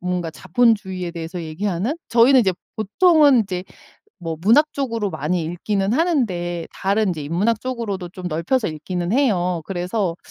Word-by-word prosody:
뭔가 180 -2 -2
자본주의에 190 -1 0
대해서 170 +1 -6
얘기하는 190 - -2
저희는 245 +3 +6
이제 195 -5 +2 0.2
보통은 290 - +4
이제 185 -3 -5 0.6
뭐 165 -1 -4
문학 265 - +4
쪽으로 230 -7 -2
많이 160 +3 -1
읽기는 195 +5 -1
하는데 195 - 0
다른 200 +2 +1
이제 155 -4 -5
인문학 200 +9 0
쪽으로도 220 -8 -4
좀 180 0 -7
넓혀서 180 +10 0
읽기는 175 +4 -3
해요. 180 - +1
그래서 185 0 -2
190 Hz, 355 characters per minute, -21 LUFS, 175-230 Hz, 0.6 s, 저희는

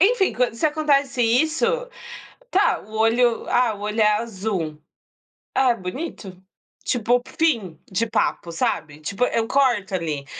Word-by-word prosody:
enfim, 395 +1 +3
quan 245 -2 0
se 230 - -4
acontece 285 -4 +1
isso, 310 - +2 0.8
tá, 390 -2 +2
o 215 +2 -12
olho 230 +1 +2
ah, 240 -3 +2
o 205 - -12
olho 210 +2 -1
é 210 0 +5
azul. 190 -8 -4 0.8
"É, 260 -2 +4
bonito", 190 - -7 0.4
tipo, 245 +1 +1 0.2
fim 225 - +1
de 200 +5 0
papo, 170 -5 -1
sabe? 155 -2 -2
Tipo, 200 +10 -1
eu 230 -2 0
corto 240 -9 +2
ali. 155 -5 -3
230 Hz, 140 wpm, -22 LUFS, 190-265 Hz, 0.8 s, é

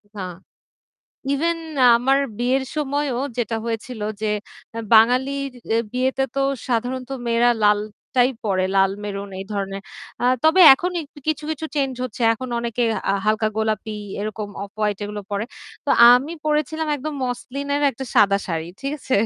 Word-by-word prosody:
না। 200 - -5 1.1
ইভেন 330 +4 0 0.4
আমার 265 +3 +2 0.2
বিয়ের 255 +2 +1
সময়ও 285 -3 -1 0.2
যেটা 225 -1 -1
হয়েছিল 230 0 -4 0.2
যে - - +1 0.5
আ - - -3 0.2
বাঙালির 265 +5 +3 0.2
এ - - +3
বিয়েতে 260 +1 0
তো 275 - 0 0.3
সাধারণত 250 +2 -2 0.2
মেয়েরা 235 +1 +3
লালটাই 210 +5 +1
পড়ে 190 -2 +1
লাল 195 0 +4
মেরুন 200 -1 -5
এই 195 - -5
ধরনের। 195 -1 -3 0.4
আ - - +1 0.2
তবে 330 +4 +5
এখন 360 +6 -2 0.4
কিছু, 305 -1 -1
কিছু 315 0 -3
চেঞ্জ 270 -2 +1
হচ্ছে। 240 0 -6
এখন 255 +3 -5
অনেকে 235 0 -2 0.3
আ - - +3
হালকা 215 0 +2
গোলাপি 220 -1 -1 0.2
এরকম 210 0 -4
অফ 200 - -7
হোয়াইট 210 -2 0
এগুলো 205 0 -5
পড়ে। 205 +2 -1 0.4
তো - - +1 0.2
আমি 265 +6 +2
পড়েছিলাম 310 +1 0
একদম 300 +2 -5
মসলিনের 280 +3 -3
একটা 265 +1 -7
সাদা 200 -1 +5
শাড়ি। 165 -2 -3
ঠিক 275 +1 -3
আছে? 260 - 0
245 Hz, 150 wpm, -22 LUFS, 210-275 Hz, 1.1 s, তবে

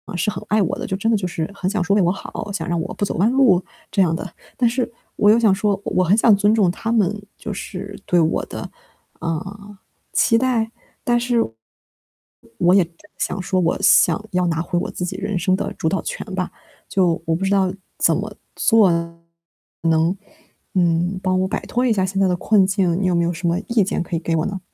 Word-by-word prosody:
是 180 +4 0
很 - - -7
爱 215 0 +3
我 180 - -1
的， - - -4
就 190 - -2
真 225 +4 0
的 220 - +3
就 185 - -2
是 165 -2 -3
很 185 -2 -2
想 205 -2 0
说 200 +3 +2
为 205 - +4
我 175 - +3
好， 200 +1 -6
想 195 - -4
让 170 -1 0
我 180 - -5
不 205 - -1
走 - - -4
弯 215 +7 +3
路， 245 -9 +4 0.3
这 195 - +2
样 165 -3 +2
的。 180 +1 -6 0.2
但 240 -2 +3
是 245 +1 -2 0.2
我 205 - +4
又 225 +2 +6
想 215 -4 +4
说， 200 0 0
我 185 - +1
很 195 +5 +3
想 220 -2 +6
尊 205 +2 +3
重 195 -6 +3
他 225 +5 -4
们， 210 -2 +1 0.2
就 210 - -5
是 200 +1 -7
对 175 - +3
我 160 -1 +1
的， - - -7 0.5
呃， 195 +5 -5 0.3
期 230 - +3
待， 235 -3 +1 0.3
但 240 0 +2
是 245 0 0 1.2
我 175 +1 +4
也 190 -4 +5 0.3
想 190 - -2
说 185 0 0
我 170 -1 +1
想 175 +5 +4
要 180 -1 +1
拿 165 -1 0
回 175 +1 -2
我 - - -4
自 180 - -4
己 185 +1 -5
人 200 -1 -2
生 185 +2 +2
的 190 - -3
主 160 - -3
导 195 - 0
权 - - -5
吧， 180 -1 -2 0.4
就 175 -4 +1
我 165 - +1
不 195 +3 -2
知 195 - 0
道 190 -2 +2 0.2
怎 - - +3
么 - - -4 0.2
做 220 -6 +4
能， 170 0 -3 1.6
嗯， 175 +1 +1
帮 185 0 +1
我 190 - 0
摆 - - -2
脱 250 +1 0
一 240 - +3
下 190 -3 +1
现 195 +1 -1
在 195 - +4
的 180 - +1
困 195 +1 +3
境， 190 -2 +1
你 190 - +1
有 180 - +2
没 170 0 +2
有 170 - 0
什 175 +1 -4
么 170 - +1
意 235 -3 +3
见 185 - -1
可 175 - -6
以 - - 0
给 165 0 -1
我 155 - 0
呢？ 195 -1 -4
190 Hz, 245 characters per minute, -21 LUFS, 175-210 Hz, 1.6 s, 又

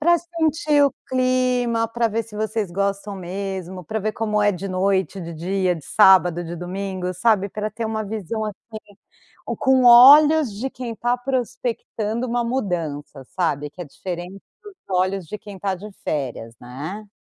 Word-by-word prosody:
Pra 345 +2 +4
sentir 315 -3 +1
o 280 - +2
clima, 255 -2 +1
pra 230 0 0
ver 225 +1 -2
se 215 -1 -15
vocês 215 -3 -2
gostam 200 +1 -2
mesmo, 185 -1 -5
pra 220 +6 -3
ver 215 +1 -1
como 210 -1 0
é 205 - +4
de 195 0 -5
noite, 190 +1 0
de 170 0 -7
dia, 180 +2 0
de 155 - -12
sábado, 180 -4 +5
de 170 +1 -6
domingo, 185 +1 -4
sabe, 200 +1 +2
pra 215 +2 -4
ter 225 +1 -5
uma 220 0 -2
visão, 215 +1 -4
assim, 215 0 -9 0.5
o - - -3
com 260 -1 +3
olhos 285 +2 +8
de 260 +6 -4
quem 240 -2 -6
tá 240 +2 0
prospectando 245 -2 -3
uma 240 0 0
mudança, 165 - -3
sabe, 150 -5 0
que 150 - -13
é - - -7
diferente 180 +5 -7 0.2
dos 415 -2 -12
olhos 185 -1 0
de 210 - -6
quem 205 -2 -10
está 195 0 -2
de 205 +4 -9
férias, 125 -6 -3
né. 155 +13 -7
205 Hz, 170 wpm, -22 LUFS, 185-240 Hz, 0.5 s, olhos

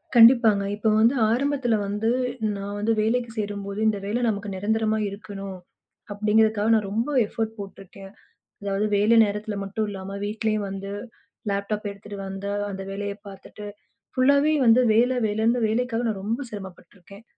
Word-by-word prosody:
கண்டிப்பாங்க. 230 -3 +7
இப்ப 210 +2 -2
வந்து 230 +4 +5 0.2
ஆரம்பத்துல 265 -1 +1
வந்து 210 +3 -1 0.5
நான் 200 +1 -5
வந்து 220 +2 +1
வேலைக்குச் 230 +1 -1
சேரும்போது 205 -1 -4
இந்த 215 -1 +2
வேலை 220 +5 -1
நமக்கு 205 -1 -3
நிரந்தரமா 220 +2 0
இருக்கணும், 195 -1 -8 0.6
அப்படிங்கறதுக்காக 215 +1 +2
நான் 210 -2 0
ரொம்ப 230 +7 -1 0.2
எஃபர்ட் 225 +1 -3
போட்டிருக்கேன். 195 0 -10 0.5
அதாவது 200 +1 0
வேலை 210 +3 +4
நேரத்துல 210 +1 -3
மட்டும் 210 +2 -2
இல்லாம 195 0 -6
வீட்டிலயும் 215 -1 -1
வந்து 195 +1 -6 0.6
லேப்டாப் 205 +1 -2
எடுத்துட்டு 200 0 -9
வந்து 195 +1 -5 0.2
அந்த 195 -1 -5
வேலைய 200 +1 -4
பார்த்துட்டு 200 +1 -11 0.5
ஃபுல்லாவே 280 +4 +4
வந்து 230 +2 +6
வேலை 245 +3 +3
வேலைன்னு 225 +2 +1
வேலைக்காக 240 +1 -1
நான் 200 -3 -3
ரொம்ப 225 +5 -1
சிரமப்பட்டுருக்கேன். 195 0 -11
210 Hz, 140 wpm, -24 LUFS, 200-225 Hz, 0.6 s, கண்டிப்பாங்க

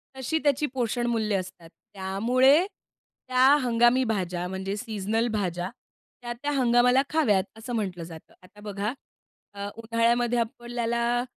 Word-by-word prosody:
तशी 265 +4 -1
त्याची 285 0 +2
पोषणमूल्य 235 -3 0
असतात. 175 -2 -10 0.2
त्यामुळे 245 - +3
त्या 255 -9 -3 0.2
हंगामी 240 +1 +3
भाज्या 180 -6 -2
म्हणजे 190 +1 -4
सीझनल 220 0 -1
भाज्या 180 -4 -2 0.5
त्या-त्या 240 +4 -4
हंगामाला 250 -1 +4
खाव्यात, 230 -12 +2
असं 235 +3 -7
म्हटलं 185 -6 -3
जातं. 165 -1 -12
आता 185 +3 -18
बघा, 205 +2 -3 0.6
अ, 200 0 -5
उन्हाळ्यामध्ये 235 +1 +1
आपल्याला 240 0 -1
230 Hz, 115 wpm, -26 LUFS, 200-245 Hz, 0.6 s, हंगामाला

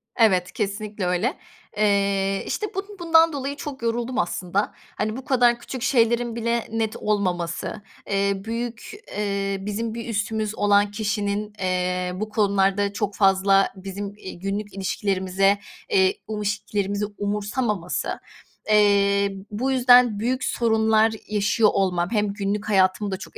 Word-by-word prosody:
Evet, 185 -6 +3
kesinlikle 210 -1 -3
öyle. 180 - +1 0.4
Eee, 200 -1 +1
işte, 425 - -2
bun 390 - -1 0.2
bundan 330 -1 +5
dolayı 280 0 -3
çok 280 -3 -7
yoruldum 235 +2 -1
aslında. 175 +3 -1 0.3
Hani, 215 +2 -2
bu 265 - -8
kadar 240 -2 +3
küçük 255 0 -7
şeylerin 235 -2 +2
bile 235 0 -1
net 225 -1 -1
olmaması, 180 -3 -2 0.3
eee, 200 0 +2
büyük 230 +4 -5 0.3
eee, 200 -1 -1
bizim 220 +3 -3
bir 235 0 -6
üstümüz 215 0 -2
olan 205 0 +3
kişinin, 210 -1 -2
eee, 180 -1 -1
bu 215 +3 -4
konularda 200 -1 +1
çok 205 -1 -2
fazla 195 0 +4
bizim, 195 +1 -6
iii, 185 -4 -9
günlük 200 +2 -4
ilişkilerimize, 195 0 +1 0.3
eee, 390 -3 +3
um 215 -1 -4
ilişkilerimizi 205 0 -1
umursamaması. 205 -2 -2 0.5
Eee, 200 -1 +4 0.2
bu 250 +6 -1
yüzden 245 -4 +5
büyük 250 +4 -1
sorunlar 220 -1 +2 0.2
yaşıyor 210 +1 +2
olmam 180 -3 +1
hem 210 -3 0
günlük 205 +1 -2
hayatımı 195 +1 +2
da 190 - -2
çok - - -11
205 Hz, 135 wpm, -23 LUFS, 195-230 Hz, 0.5 s, bundan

